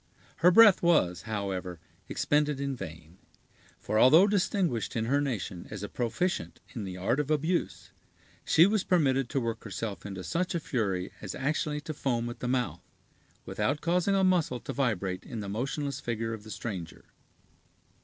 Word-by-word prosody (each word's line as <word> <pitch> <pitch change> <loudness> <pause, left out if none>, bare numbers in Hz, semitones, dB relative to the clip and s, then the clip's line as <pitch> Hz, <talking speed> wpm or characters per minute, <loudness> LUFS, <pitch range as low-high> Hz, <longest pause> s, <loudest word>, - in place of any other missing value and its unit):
Her 175 - +6
breath 210 +1 +7
was, 90 - +3
however, 95 -4 -3 0.3
expended 150 -1 +1
in 140 -1 -2
vain; 80 -4 -10 0.6
for, 110 - -1
although 155 - +7
distinguished 190 - 0
in 115 -1 0
her 140 +5 +2
nation 105 -10 -4
as 105 -2 -6
a 105 - -4
proficient 130 +11 -2
in 115 -6 -5
the 90 -1 -6
art 115 +9 0
of 150 -1 -1
abuse, 155 +4 -1 0.5
she 165 - +6
was 210 0 +2
permitted 135 -7 +2
to 135 - 0
work 115 -2 -3
herself 105 0 -5
into 95 -2 -6
such 175 - -1
a - - +1
fury 100 - -2
as 100 -3 -5
actually 150 +2 -1
to 155 - -5
foam 120 -5 -1
at - - -10
the 125 - -3
mouth, 125 -1 -1 0.6
without 145 +2 -1
causing 180 +3 +2
a 195 - +3
muscle 175 -9 +2
to - - -5
vibrate 100 -8 -1
in 115 - -7
the 100 - -5
motionless 135 +5 -3
figure 115 -1 -3
of 110 - -7
the 110 - -12
stranger. 95 -7 -6
125 Hz, 170 wpm, -29 LUFS, 105-155 Hz, 0.6 s, breath